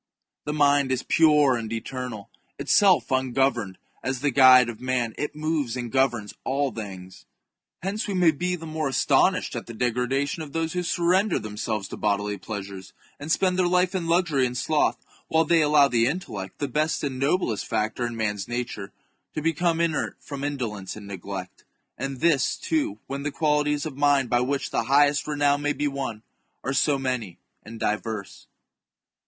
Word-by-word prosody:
The 150 - -2
mind 145 -2 +3
is 130 0 0
pure 150 -5 +4
and 115 -2 -4
eter 125 +2 -4
nal; 110 -1 -9 0.3
itself 150 - +3
ungoverned, 130 -6 0 0.2
as 130 -1 -3
the 145 -1 +1
guide 130 -1 +7
of 120 -2 -7
man, 125 -3 -1
it 150 - -4
moves 150 -5 -1
and 120 -2 -5
governs 120 -6 +1
all 140 0 0
things. 95 -4 -9 0.6
Hence 205 +4 -2
we 200 - -2
may 175 -3 +5
be 180 +4 -2
the 165 -2 -9
more 155 -2 -2
astonished 130 - +2
at - - -5
the 115 - -8
degradation 125 +6 -1
of 150 -3 -8
those 165 0 -1
who 180 - -1
surrender 180 +3 +2
themselves 105 -1 -3
to - - -7
bodily 105 -1 -1
pleasures, 100 -2 -7 0.3
and 145 +3 -5
spend 185 +1 +2
their 180 - +3
life 180 +1 +2
in 180 -3 -2
luxury 165 -6 +2
and 125 0 -5
sloth, 155 +3 0 0.2
while 160 0 +2
they 170 -1 +4
allow 150 -1 +5
the 120 -3 +2
intellect, 115 - -4
the 145 - -2
best 155 +5 -1
and 135 -3 -3
noblest 135 - 0
factor 110 +2 -1
in 120 -1 -3
man's 105 -3 -2
nature, 120 -5 -4 0.4
to - - -1
become 165 +1 +1
inert 170 -3 -1
from 140 -1 -7
indolence 115 -10 -4
and 105 -1 -10
neglect; 95 -1 -7 0.3
and 135 -2 -5
this, 150 -6 +3
too, 150 -10 -1
when 140 +1 -5
the 145 - -2
qualities 150 -1 +1
of 155 -4 -5
mind 140 -3 +2
by 120 - +4
which 135 +2 -1
the - - 0
highest 145 +1 +3
renown 145 -1 +1
may 145 0 0
be 150 - -1
won, 135 -6 -4 0.4
are 135 - -1
so 140 +1 +2
many 125 -9 -3 0.2
and 115 +1 -10
diverse. 105 -1 -3
135 Hz, 180 wpm, -25 LUFS, 115-150 Hz, 0.6 s, guide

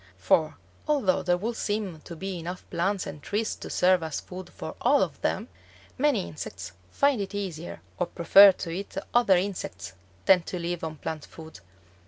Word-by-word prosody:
For 155 - +2 0.3
although 245 -12 +2
there 175 -1 +2
would 225 +6 -3
seem 205 -6 -2
to 170 - -8
be 190 +1 -5
enough 175 +2 -7
plants 190 +2 0
and 145 - -8
trees 210 +7 -2
to - - -8
serve 185 0 +3
as 160 -2 -3
food 185 0 -9
for - - -7
all - - +4
of - - -5
them, - - -1 0.5
many 270 -8 +1
insects 95 - -7 0.2
find 280 - +2
it 200 +1 -5
easier 175 -5 -5 0.2
or 180 - +1
prefer 195 +4 +8
to 175 -2 -6
eat 195 +3 -6 0.2
other 235 -6 +5
insects 195 +1 -4 0.3
than 185 -2 +6
to 180 - -5
live 175 0 -3
on 160 -1 -4
plant 155 0 -5
food. 160 - -12
185 Hz, 180 wpm, -27 LUFS, 165-200 Hz, 0.5 s, prefer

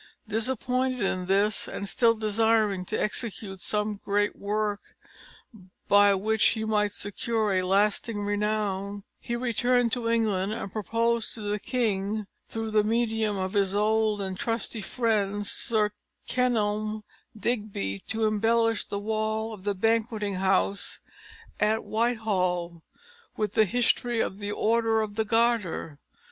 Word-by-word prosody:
Disappointed 255 +3 -1
in 185 -2 -1
this, 200 +2 +2
and 200 - -5
still 230 +3 +3
desiring 215 -3 +1
to 215 - -2
execute 210 -3 -3
some 210 0 -1
great 205 +1 +1
work 210 0 -3 0.9
by 205 0 +6
which 215 +3 +1
he 220 0 -2
might 210 -1 +1
secure 210 +1 -1
a 185 - +2
lasting 205 +3 +1
renown, 205 -1 -1 0.2
he 235 - -3
returned 245 0 +2
to 235 -1 0
England 215 -4 +1
and 195 -3 -5
proposed 230 +2 0
to 220 - -7
the 210 0 -2
king, 215 -3 -1 0.2
through 225 -1 -4
the 215 -1 +4
medium 220 -2 0
of 185 0 -2
his 200 -1 +1
old 215 0 +2
and 190 -1 -4
trusty 230 -1 -2
friend 205 -3 0
Sir 210 0 +1 0.4
Kenelm 215 -3 0 0.3
Digby, 205 - -2
to 220 0 0
embellish 225 +1 +2
the 200 - -4
wall 220 +1 -1
of 200 -2 -11
the 205 -1 0
Banqueting 220 -1 0
House 195 +1 +1 0.6
at 215 +1 +2
Whitehall 185 -7 0 0.6
with 210 -2 -1
the 220 -1 +5
history 240 +2 +1
of 195 - -1
the 205 0 -3
Order 225 +1 +2
of 215 -1 -3
the 220 +1 -1
Garter. 225 -9 0
215 Hz, 135 wpm, -27 LUFS, 200-225 Hz, 0.9 s, by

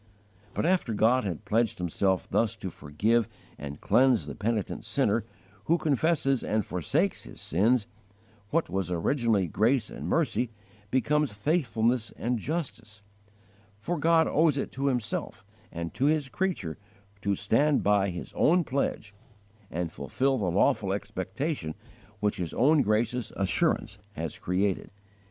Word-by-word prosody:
But, - - 0
after 170 - +1
God 115 +3 +3
had 95 +2 -4
pledged 115 +2 +1
Himself 90 +2 0
thus 115 0 +1
to 100 -4 -6
forgive 105 +12 0 0.3
and 70 0 -7
cleanse 130 -3 +3
the - - -6
penitent 110 -2 -2
sinner - - +1 0.4
who 170 - +3
confesses 145 -3 +1
and 110 -2 0
forsakes 90 -4 0
his - - -11
sins,* 110 - +2 0.6
what 165 +1 +1
was 95 -2 -2
originally 105 - +1
grace 110 - +1
and - - -6
mercy 140 -7 +1 0.4
becomes 150 +2 +1
faithfulness 115 -2 0
and 120 0 -1
justice; 120 - -5 0.7
for 160 +11 -3
God 165 +1 +4
owes 155 -2 +3
it 135 - -2
to 135 +1 -2
Himself 120 -5 -2 0.3
and 85 0 -5
to 135 - 0
His 150 -2 +2
creature 120 - -2 0.4
to 100 -1 +1
stand 135 +9 +2
by 100 -1 +3
His 90 -1 -7
own 175 +2 +4
pledge, 125 -7 -2 0.6
and 85 0 -3
fulfil 135 0 0
the 95 -4 0
lawful 95 +2 +2
expectation 100 - -3 0.4
which 105 0 0
His 85 -3 -4
own 145 +4 +5
gracious 115 +2 0
assurance 95 -2 0
has - - -5
created. 95 +2 -1
115 Hz, 140 wpm, -28 LUFS, 100-140 Hz, 0.7 s, own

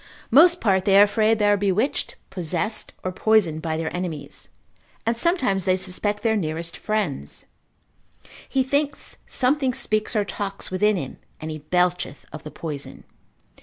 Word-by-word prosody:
Most 345 +7 +7
part 190 -3 +2
they 195 -1 +5
are - - +10
afraid 215 +2 +3
they 210 - +1
are 205 0 +5
bewitched, 205 +6 0 0.2
possessed, 185 +4 -2
or 185 - -2
poisoned 185 -5 +2
by 160 -1 -2
their 160 +1 -3
enemies, 175 -5 -5 0.6
and 230 +1 +1
sometimes 255 - +1
they 185 +1 +2
suspect 205 +3 -2
their 225 -1 +2
nearest 165 -3 -2
friends: 195 - -3 1.0
he 265 -1 +2
thinks 285 +1 -1
something 260 -1 +1
speaks 215 +2 -1
or 210 -1 +2
talks 200 -1 -4
within 210 +2 +2
him, 135 -6 -6 0.2
and 155 0 -5
he 155 - -5
belcheth 180 -1 0
of 155 - -7
the 150 - -8
poison. 150 -3 -7
195 Hz, 155 wpm, -23 LUFS, 170-220 Hz, 1.0 s, are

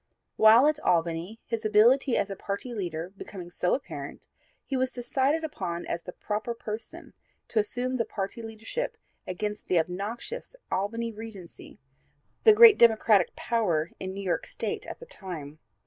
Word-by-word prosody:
While 220 +4 +7
at 300 0 +2
Albany 170 - 0
his 230 -1 -3
ability 235 +5 +4
as 200 - 0
a - - -3
party 200 +6 -4
leader 175 -3 -4
becoming 180 -3 -9
so 180 - +1
apparent 270 - -7 0.4
he 275 - -3
was 260 0 +1
decided 270 +5 0
upon 175 - -4
as 170 - -3
the 180 - -8
proper 215 +5 -3
person 220 -1 -7 0.4
to 225 - +1
assume 250 +4 -1
the 230 - +2
party 200 +1 -5
leadership 225 - -5 0.3
against 210 +3 -4
the 180 - +2
obnoxious 205 - -3 0.2
'Albany 230 +4 -1
Regency,' 210 -5 -10 0.7
the 435 - +10
great 450 -1 +9
Democratic 220 -4 +5
power 175 -9 0
in 190 - -4
New 200 - -5
York 180 - -1
State - - -4
at - - -6
the 485 - -10
time. 155 - -8
215 Hz, 155 wpm, -28 LUFS, 185-240 Hz, 0.7 s, the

